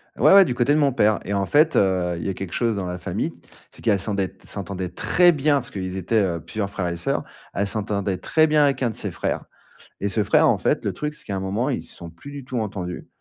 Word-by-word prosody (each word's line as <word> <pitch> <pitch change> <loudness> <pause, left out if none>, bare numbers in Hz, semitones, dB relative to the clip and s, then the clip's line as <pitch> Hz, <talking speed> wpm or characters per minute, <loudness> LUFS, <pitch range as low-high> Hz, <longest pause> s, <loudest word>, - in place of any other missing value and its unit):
Ouais, - - +5
ouais, 195 -1 +9
du 125 - -2
côté 125 +4 +2
de 155 - +3
mon 140 -2 +3
père 105 -4 +3
et 100 - -2
en 100 -1 +1
fait, 155 - +3
heu, 90 -3 +2
il - - -6
y - - -1
a - - -1
quelque 95 -1 -6
chose 115 -2 +1
dans 95 -2 -3
la 90 - -4
famille, 90 - -3 0.4
c'est - - -16
qu'elle 105 -4 +3
s'endet 100 -3 -2
s'entendait 95 -1 -5
très 175 - +4
bien- 145 -1 +2
parce 125 -4 -2
qu'ils 95 -2 -5
étaient, 100 +4 +1
heu, 85 -3 -1
plusieurs 100 +4 -4
frères 90 -3 -2
et 85 - -4
sœurs- 85 - -1 0.3
elle 100 0 0
s'entendait 100 -2 -2
très 155 - +2
bien 150 -1 +4
avec 135 -2 +1
un 120 - +2
de 110 - -7
ses - - -4
frères - - -2 0.6
et 100 - 0
ce 105 +1 0
frère, - - +4
en - - +3
fait, - - +1
le - - +1
truc, 150 0 -4
c'est 150 - -9
qu'à, 100 - -3
un - - -2
moment, 100 +6 -1
ils - - -2
se - - -14
sont 85 - -9
plus 140 +13 -12
du 140 -2 -7
tout 130 -2 -3
entendus 95 -5 -5
100 Hz, 275 wpm, -23 LUFS, 95-135 Hz, 0.6 s, ouais